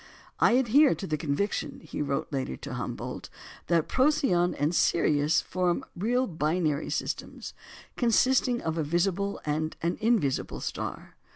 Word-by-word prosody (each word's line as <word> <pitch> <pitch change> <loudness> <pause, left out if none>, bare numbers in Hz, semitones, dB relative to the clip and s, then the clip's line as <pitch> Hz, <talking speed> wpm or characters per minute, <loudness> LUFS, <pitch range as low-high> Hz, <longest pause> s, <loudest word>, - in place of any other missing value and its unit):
"I - - +5
adhere 265 +4 +5
to 195 - -6
the 155 - -1
conviction," 155 +7 -2
he 155 - -5
wrote 140 +1 -2
later 130 - -2
to - - -7
Humboldt, - - -5 0.4
"that 170 -2 +2
Procyon 260 - +2
and 150 +4 0
Sirius 155 -2 +2
form 180 -1 -1
real 245 +8 +1
binary 155 - -1
systems, - - -4 0.4
consisting 245 +1 +3
of 160 0 -2
a - - +1
visible 190 +5 0
and 155 +1 -1
an 170 +1 -1
invisible 215 - +1
star. - - -5
175 Hz, 135 wpm, -28 LUFS, 155-230 Hz, 0.4 s, I